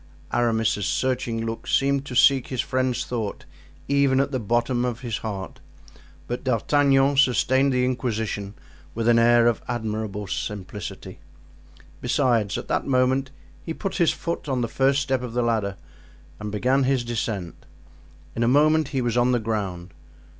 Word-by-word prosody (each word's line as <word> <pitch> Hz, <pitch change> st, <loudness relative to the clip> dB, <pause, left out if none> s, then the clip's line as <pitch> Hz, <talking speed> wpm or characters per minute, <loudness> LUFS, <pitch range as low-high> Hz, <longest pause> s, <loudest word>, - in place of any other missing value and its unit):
Aramis's 110 Hz, -4 st, +1 dB
searching 125 Hz, -3 st, -1 dB
look 115 Hz, 0 st, -5 dB
seemed 140 Hz, 0 st, +1 dB
to 125 Hz, -, -6 dB
seek 135 Hz, 0 st, +5 dB
his 130 Hz, -, -5 dB
friend's 130 Hz, -2 st, -1 dB
thought 110 Hz, -5 st, -4 dB, 0.4 s
even 140 Hz, -1 st, +3 dB
at 140 Hz, +1 st, +1 dB
the 130 Hz, -, -1 dB
bottom 120 Hz, +3 st, 0 dB
of 125 Hz, 0 st, -3 dB
his 115 Hz, -4 st, -3 dB
heart, 100 Hz, -4 st, -6 dB, 0.7 s
but 120 Hz, -, -4 dB
D'Artagnan 135 Hz, +2 st, +2 dB
sustained 135 Hz, +1 st, +3 dB
the 125 Hz, -1 st, +2 dB
inquisition 110 Hz, -5 st, -2 dB, 0.4 s
with 115 Hz, 0 st, -1 dB
an 115 Hz, 0 st, +5 dB
air 120 Hz, 0 st, +5 dB
of 120 Hz, -2 st, +2 dB
admirable 110 Hz, -3 st, -3 dB
simplicity. 100 Hz, +1 st, -6 dB, 0.8 s
Besides, 115 Hz, -8 st, +1 dB
at -, -, -6 dB
that -, -, -1 dB
moment 130 Hz, 0 st, +2 dB, 0.3 s
he 165 Hz, -, -5 dB
put 195 Hz, -, -4 dB
his 170 Hz, -4 st, +4 dB
foot 170 Hz, -3 st, -4 dB
on 130 Hz, -2 st, 0 dB
the 120 Hz, -, 0 dB
first 135 Hz, +4 st, +2 dB
step 135 Hz, -2 st, -1 dB
of 125 Hz, -2 st, -6 dB
the 120 Hz, 0 st, +1 dB
ladder 110 Hz, -5 st, 0 dB, 0.6 s
and 105 Hz, -1 st, -5 dB
began 130 Hz, +6 st, +1 dB
his 130 Hz, -2 st, +1 dB
descent. 110 Hz, -6 st, -4 dB, 0.7 s
In 115 Hz, -, -2 dB
a 115 Hz, -, +3 dB
moment 155 Hz, +3 st, +4 dB
he 135 Hz, -3 st, -2 dB
was 120 Hz, -1 st, -1 dB
on 125 Hz, +1 st, +3 dB
the 120 Hz, -, +2 dB
ground. 95 Hz, -6 st, -4 dB
120 Hz, 160 wpm, -24 LUFS, 110-135 Hz, 0.8 s, seek